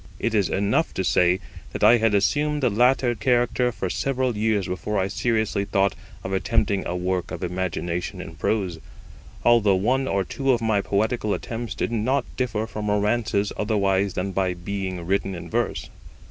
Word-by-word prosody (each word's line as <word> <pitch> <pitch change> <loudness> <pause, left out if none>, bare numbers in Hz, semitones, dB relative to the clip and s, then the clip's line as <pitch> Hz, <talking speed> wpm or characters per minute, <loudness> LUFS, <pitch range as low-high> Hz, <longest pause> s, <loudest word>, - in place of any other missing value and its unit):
It 115 - -1
is 100 -4 +2
enough 100 +10 0
to 95 - 0
say, 90 0 +3 0.3
that - - -3
I 115 +3 +7
had 110 -2 +2
assumed 145 +8 +1
the 125 - +3
latter 125 +3 +3
character 125 +1 +1
for 95 - -3
several 130 +4 -1
years 105 -2 +1
before 95 +3 -3
I 95 0 +1
seriously 110 -1 0
thought 100 -1 +1 0.3
of 95 - -4
attempting 100 0 +1
a 90 - -2
work 90 0 -1
of - - -6
imagination 90 0 -3
in 90 -3 -7
prose, 90 +1 -1 0.7
although 115 -5 +5
one 130 +8 +1
or 100 -4 +1
two 135 +7 0
of 120 - +1
my 110 -3 +1
poetical 105 +2 0
attempts 115 0 -5
did - - -2
not 125 +4 0
differ 110 -4 -1
from 105 -2 -4
romances 105 0 +1
otherwise 100 -3 +1
than 95 +2 -2
by 95 -1 0
being 95 -1 -4
written 95 +1 0
in 85 - -8
verse. - - -1
105 Hz, 175 wpm, -24 LUFS, 95-115 Hz, 0.7 s, I